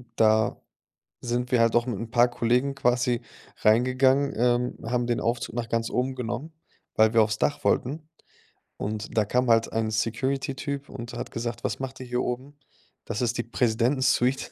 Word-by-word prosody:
Da 110 -1 +3 0.6
sind 125 0 -2
wir 125 - +4
halt 115 0 +3
auch 120 +1 +3
mit 110 -6 -3
'n 115 -1 -6
paar 120 0 +4
Kollegen 125 +4 +1
quasi 125 -2 +1 0.4
reingegangen, 130 +5 +3
ähm, 120 +1 +1
haben 120 0 0
den 120 -1 0
Aufzug 120 0 -2
nach 120 -1 -2
ganz 115 0 0
oben 130 +1 -1
genommen, 125 +6 -4 0.4
weil 110 0 +4
wir 115 -1 +6
aufs 110 0 -2
Dach 145 - 0
wollten. 150 +5 0 0.7
Und 105 +2 -5
da 110 - +5
kam 125 +3 +1
halt 115 0 +3
ein 110 -1 0
Security 130 +5 -1
Typ 140 +1 -5
und 120 -3 -8
hat 120 - -6
gesagt: 120 0 -4
„Was - - -2
macht 135 0 -6
ihr 130 - -6
hier 125 0 -1
oben? 130 +4 -4 0.5
Das 105 - -3
ist 120 -1 0
die 120 - -1
Präsidentensuite." 125 +3 +1
120 Hz, 180 wpm, -26 LUFS, 115-130 Hz, 0.7 s, wir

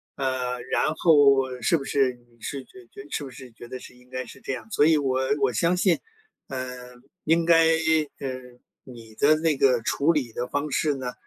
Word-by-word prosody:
呃， 125 -2 -2
然 155 - +1
后 140 -6 +4
是 170 - +3
不 140 - -6
是， 135 -2 +1
你 120 -1 -25
是 135 +4 -5
觉 125 0 -16
觉 - - -10
是 145 - -3
不 135 - -8
是 125 0 -11
觉 120 +1 -12
得 130 - -7
是 125 - -13
应 125 0 -21
该 130 0 -4
是 - - -13
这 - - -4
样？ 130 - -8
所 150 -8 +3
以 160 - +5
我 130 -2 0 0.2
我 135 -2 +3
相 170 +10 +2
信， 180 -1 +2 0.5
呃， 125 -1 -6 0.3
应 165 +2 +2
该， 165 -1 +5 0.5
呃， 135 - -4 0.5
你 115 -3 -13
的 150 +6 +4
那 155 -2 +1
个 130 -3 +3
处 140 +7 +1
理 135 -7 -1
的 120 - -3
方 145 +1 -2
式 150 +2 +1
呢， 125 -2 -5
130 Hz, 220 characters per minute, -25 LUFS, 125-150 Hz, 0.5 s, 以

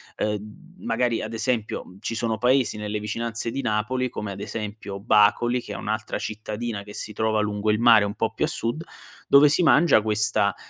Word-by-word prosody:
ehm, 105 - -5
magari 125 - 0
ad 110 +1 -5
esempio 115 -2 -2 0.2
ci 115 +2 -4
sono 115 -1 -1
paesi 125 -1 +2
nelle 105 0 -3
vicinanze 115 +2 -3
di 135 - -3
Napoli, 125 +2 -1
come 105 -3 -5
ad 100 - -8
esempio 105 -2 -6
Bacoli, 110 +4 +3
che - - -8
è - - -6
un'altra 110 +1 -3
cittadina 110 0 -5
che 105 +1 -11
si 105 - -6
trova 110 0 +1
lungo 105 0 -1
il 105 0 +2
mare 115 -3 +6
un 100 +1 -4
po' 110 -1 -1
più 135 - 0
a - - -3
sud, 155 0 -3 0.4
dove 140 +1 +7
si 150 - +2
mangia 165 -6 +5
questa, 105 -2 +1
110 Hz, 190 wpm, -24 LUFS, 105-120 Hz, 0.4 s, dove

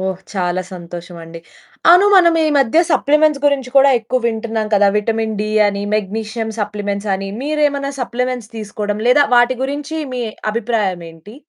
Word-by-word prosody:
ఓహ్! 190 -1 -3
చాలా 185 -2 -1
సంతోషం 175 0 -9
అండి. 165 0 -10 0.5
అవును, 360 +4 +7
మనం 340 -3 +5
ఈ - - +2
మధ్య 270 +4 +2
సప్లిమెంట్స్ 300 -1 +2
గురించి 270 -3 0
కూడా 275 0 +6
ఎక్కువ 250 +3 -2
వింటున్నాం 225 -1 -2
కదా! 205 0 +4
విటమిన్ 220 +1 -2
డి 215 0 -2 0.2
అని, 200 0 -3
మెగ్నీషియం 220 +2 -4
సప్లిమెంట్స్ 205 0 -3
అని. 195 0 -6
మీరేమైనా 290 -1 -1
సప్లిమెంట్స్ 250 -1 -3
తీసుకోవడం 210 -1 -4
లేదా 285 +3 +5
వాటి 240 +1 +4
గురించి 290 +3 -4 0.2
మీ 250 - -3 0.3
అభిప్రాయం 215 -6 -1
ఏంటి? 165 +7 -15
225 Hz, 150 wpm, -17 LUFS, 205-270 Hz, 0.5 s, అవును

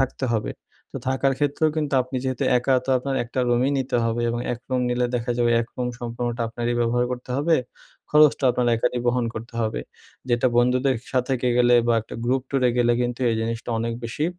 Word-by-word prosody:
থাকতে 135 0 -1
হবে। 110 - -2 0.4
তো - - -5
থাকার 135 +1 +1
ক্ষেত্রেও 145 +2 +1
কিন্তু 150 -3 -1
আপনি 130 +1 -6
যেহেতু 130 -1 -2 0.2
একা 130 +2 +1
তো 135 - -2
আপনার 135 +2 -3
একটা 120 - -7
রুমই 120 +3 +2
নিতে 130 -2 -1
হবে 115 +1 -1
এবং 120 - -2
এক 120 - -5
রুম 130 -1 +1
নিলে 125 0 +1
দেখা 120 0 -2
যাবে 120 -1 +3
এক 115 - -3
রুম 125 -1 -1
সম্পূর্ণটা 120 0 -3
আপনারই 120 +1 -2
ব্যবহার 120 +1 +1
করতে 125 0 -7
হবে, 160 +3 +3 0.5
খরচটা 150 -2 +5
আপনার 125 0 0
একারই 120 +2 0
বহন 120 0 +2
করতে 115 +2 -8
হবে। 110 - -2 0.5
যেটা 120 +1 +2
বন্ধুদের 125 +2 +3 0.2
সাথে 130 +1 0
কে 125 - +2
গেলে 120 0 +5
বা 120 - +3
একটা 110 - -11
গ্রুপ 130 +1 +1
টুরে 130 -3 +2
গেলে 120 0 +4
কিন্তু 120 +1 -3
এই - - +1
জিনিসটা 115 +1 -3
অনেক 115 +1 -2
বেশি 115 +7 -2
125 Hz, 205 wpm, -23 LUFS, 120-130 Hz, 0.5 s, খরচটা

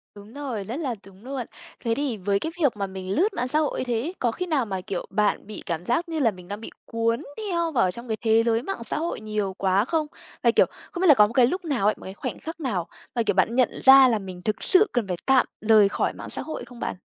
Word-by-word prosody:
Đúng 205 +2 -13
rồi, 265 -7 -4
rất 220 +5 -5
là 265 -7 -2
đúng 195 +3 -16
luôn. 265 -2 -4 0.4
Thế 230 -1 +1
thì 275 -5 -1
với 200 +1 0
cái 320 - -3
việc 270 -7 +2
mà 200 -1 -2
mình 190 0 -5
lướt 395 +6 +2
mạng 250 -7 -2
xã 300 +4 +1
hội 305 -2 -1
như - - 0
thế 240 -3 -1
ấy, 335 +8 -5
có 240 -2 +1
khi 365 - -4
nào 300 -8 +1
mà, 190 -3 -4
kiểu, 185 -1 -4
bạn 210 0 0
bị 215 - -8
cảm 170 +1 -3
giác 330 +9 0
như 325 -1 -2
là 230 -6 +3
mình 180 -2 -13
đang 205 +2 -6
bị - - -7 0.2
cuốn 230 +1 0 0.2
theo 345 -6 -1
vào 190 -10 +2
trong 235 +5 -9
cái 220 -1 -2
thế 225 0 +4
giới 230 0 +1
mạng 345 -8 -4
xã 230 - -3
hội 335 +2 -2
nhiều 210 -3 -2
quá 195 +3 +2
không? 315 +1 0 0.4
Và, 235 - +5
kiểu, - - +5 0.3
không 355 - -5
biết 375 - +4
là 300 - +10
có 210 -6 +6
một 225 - -9
cái 240 -1 +5
lúc 365 +5 -3
nào 265 -10 0
ấy, 215 - +3
một - - -14
cái 190 - -7
khoảnh - - -5
khắc 325 +1 -7
nào 205 - -2 0.3
mà, 235 - +2
kiểu, - - +1
bạn 200 +5 +2
nhận 255 -2 +4
ra 265 0 +9
là 225 -4 +1
mình 185 -2 -8
thực 210 +2 -2
sự 395 +3 +5
cần 240 -5 0
phải 180 -2 -2
tạm 265 -1 +5 0.2
lời 215 -2 +5
khỏi - - -1
mạng - - -9
xã - - -5
hội 315 - -6
hay - - -8
không 240 -1 -13
bạn? - - -3
230 Hz, 290 wpm, -25 LUFS, 205-280 Hz, 0.4 s, là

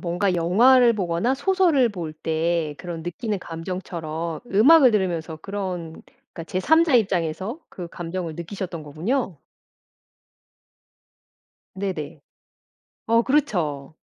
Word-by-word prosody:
뭔가 180 +2 0
영화를 235 +9 +5
보거나 185 +4 0
소설을 315 -4 +3
볼 170 -6 -6
때 160 0 -1
그런 170 -2 -6
느끼는 200 +5 -3
감정처럼 165 -2 -5
음악을 255 +7 +6
들으면서 175 -6 -1
그런 180 -2 -5 0.3
그러니까 165 - -7
제 185 - -2
3 320 - +4
자 310 -6 +1
입장에서 190 - 0
그 175 -2 -8
감정을 170 -1 -5
느끼셨던 170 -1 -6
거군요. 175 - -2 2.4
네네. 185 -7 -5 0.9
어 230 +1 +4
그렇죠. 165 - -1
180 Hz, 245 characters per minute, -23 LUFS, 165-225 Hz, 2.4 s, 음악을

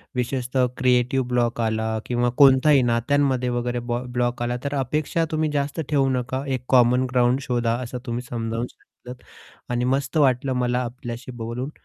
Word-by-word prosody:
विशेषतः 125 +1 0
creative 125 0 +2
block 120 -1 0
आला 110 0 0 0.2
किंवा 120 0 0
कोणताही 140 0 +6
नात्यांमध्ये 130 +1 +1
वगैरे 120 0 -2
ब्लँ 120 +1 -2
ब्लॉक 120 0 -1
आला 120 +1 -1
तर 140 0 -2
अपेक्षा 150 +5 0
तुम्ही 155 -1 0
जास्त 145 +2 -2
ठेवू 140 -3 +2
नका 130 +1 -2
एक 125 0 -8
कॉमन 125 0 +4
ग्राउंड 125 +1 +3
शोधा 120 -3 0
असं 125 +1 -6
तुम्ही 120 0 -3
समजावून 115 0 -3
सांगितलंत 125 0 -14 0.5
आणि 120 0 0
मस्त 140 +2 -3
वाटलं 130 -2 +2
मला 125 0 +1
आपल्याशी 120 0 -7
बोलून 125 +4 -4
125 Hz, 155 wpm, -23 LUFS, 120-135 Hz, 0.5 s, कोणताही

